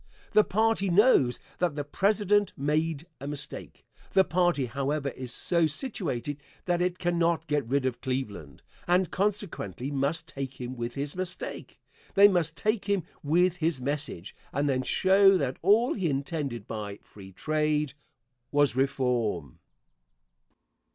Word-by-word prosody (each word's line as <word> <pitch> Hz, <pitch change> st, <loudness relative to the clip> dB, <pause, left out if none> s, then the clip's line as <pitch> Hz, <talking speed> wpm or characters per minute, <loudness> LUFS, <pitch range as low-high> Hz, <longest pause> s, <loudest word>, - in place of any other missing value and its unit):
The 215 Hz, -, +6 dB
party 220 Hz, -1 st, +1 dB
knows 175 Hz, -, +4 dB, 0.2 s
that 175 Hz, -5 st, +1 dB
the 145 Hz, -, -2 dB
President 205 Hz, +5 st, +2 dB
made 155 Hz, +2 st, 0 dB
a 140 Hz, -, -6 dB
mistake. 145 Hz, 0 st, -8 dB, 0.3 s
The 190 Hz, -, +6 dB
party, 175 Hz, -6 st, +1 dB
however, 140 Hz, +3 st, -2 dB
is 130 Hz, -2 st, -6 dB
so 170 Hz, +6 st, +2 dB
situated 150 Hz, -, -3 dB, 0.2 s
that 175 Hz, -1 st, +1 dB
it 180 Hz, 0 st, 0 dB
cannot 170 Hz, -2 st, +1 dB
get 150 Hz, -5 st, -1 dB
rid 135 Hz, +2 st, +1 dB
of 125 Hz, -2 st, -2 dB
Cleveland, 105 Hz, -, -4 dB, 0.2 s
and 180 Hz, 0 st, +2 dB
consequently 190 Hz, -, -2 dB
must 145 Hz, +4 st, -1 dB
take 135 Hz, -3 st, -6 dB
him 125 Hz, +1 st, -5 dB
with 120 Hz, 0 st, -4 dB
his 140 Hz, +3 st, -3 dB
mistake 185 Hz, -1 st, -5 dB, 0.4 s
they 200 Hz, +1 st, +9 dB
must 170 Hz, -4 st, +1 dB
take 215 Hz, -1 st, 0 dB
him 200 Hz, -3 st, +1 dB, 0.2 s
with 175 Hz, +4 st, +2 dB
his 165 Hz, -4 st, 0 dB
message, 135 Hz, -, -4 dB, 0.2 s
and 140 Hz, +2 st, 0 dB
then 130 Hz, -2 st, +1 dB
show 195 Hz, +7 st, +5 dB
that 135 Hz, -5 st, -2 dB
all 215 Hz, +7 st, +4 dB
he 185 Hz, -6 st, -1 dB
intended 140 Hz, -5 st, -3 dB
by 105 Hz, -2 st, -5 dB
"free 95 Hz, -2 st, -13 dB
trade" 150 Hz, +4 st, 0 dB, 0.6 s
was 145 Hz, -3 st, +3 dB
"reform." 125 Hz, -, 0 dB
150 Hz, 140 wpm, -28 LUFS, 135-180 Hz, 0.6 s, they